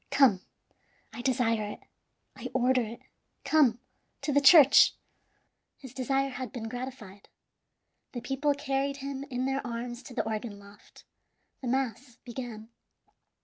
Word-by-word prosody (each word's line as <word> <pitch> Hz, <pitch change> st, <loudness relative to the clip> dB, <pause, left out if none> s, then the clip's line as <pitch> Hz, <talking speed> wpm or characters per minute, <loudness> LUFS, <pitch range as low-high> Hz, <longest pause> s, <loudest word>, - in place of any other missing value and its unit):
Come, 240 Hz, -10 st, +4 dB, 0.7 s
I 235 Hz, -, -6 dB
desire 240 Hz, -4 st, +1 dB
it, -, -, -14 dB, 0.5 s
I -, -, -6 dB
order 255 Hz, 0 st, +3 dB
it; 230 Hz, 0 st, -6 dB, 0.4 s
come, 275 Hz, -5 st, +4 dB, 0.4 s
to 295 Hz, -, -1 dB
the 285 Hz, -, +4 dB
church!" 285 Hz, -1 st, +8 dB, 0.8 s
His 265 Hz, -3 st, -12 dB
desire 270 Hz, +1 st, 0 dB
had 255 Hz, -3 st, -6 dB
been 225 Hz, -3 st, -6 dB
gratified. 245 Hz, -5 st, -8 dB, 0.8 s
The 240 Hz, -, -5 dB
people 275 Hz, +4 st, 0 dB
carried 275 Hz, 0 st, -1 dB
him 275 Hz, 0 st, -5 dB
in 250 Hz, 0 st, -2 dB
their 270 Hz, +1 st, -1 dB
arms 240 Hz, 0 st, -5 dB
to 250 Hz, -1 st, -12 dB
the 225 Hz, -, -1 dB
organ 215 Hz, -1 st, -4 dB
loft. 200 Hz, 0 st, -17 dB, 0.6 s
The 260 Hz, -, -5 dB
mass 250 Hz, -1 st, -2 dB
began. 235 Hz, -3 st, -7 dB
255 Hz, 135 wpm, -29 LUFS, 230-270 Hz, 0.8 s, church